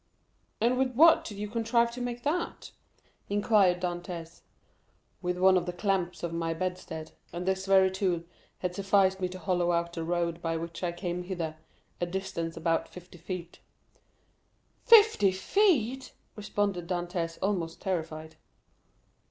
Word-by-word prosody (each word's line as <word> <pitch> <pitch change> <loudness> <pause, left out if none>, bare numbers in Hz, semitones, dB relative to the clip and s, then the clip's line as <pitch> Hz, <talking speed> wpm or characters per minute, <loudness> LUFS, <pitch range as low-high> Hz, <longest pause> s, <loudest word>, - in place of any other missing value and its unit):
"And 245 +3 +2
with 255 -2 0
what 325 +4 +7
did 205 - -7
you 210 +1 -3
contrive 235 +2 +1
to 245 +1 -7
make 245 0 -4
that?" 335 +4 -2 0.6
inquired 200 -3 +3
Dantès. 175 -2 -5 0.8
"With 180 -1 -1
one 185 +1 +5
of 180 0 -1
the 180 - -2
clamps 180 -1 -1
of 170 -1 -3
my 165 0 -1
bedstead; 170 -3 -4 0.2
and 175 +1 -5
this 190 0 -1
very 190 -1 +5
tool 185 -3 0 0.4
has 180 0 -2
sufficed 195 -1 +3
me 180 - 0
to 185 - -7
hollow 175 0 0
out 170 0 0
the 165 - -4
road 170 0 -1
by 165 -1 -1
which 165 +1 -6
I 175 -2 0
came 175 0 -4
hither, 170 -4 -4 0.5
a 175 - +1
distance 170 -3 -4
of 165 - -8
about 165 -1 +1
fifty 180 -1 -13
feet." 175 0 -7 1.3
"Fifty 440 - +7
feet!" 265 - +1 0.2
responded 200 -4 -2
Dantès, 175 -1 -2
almost 180 -4 -2
terrified. 160 -4 -4
180 Hz, 150 wpm, -29 LUFS, 170-205 Hz, 1.3 s, what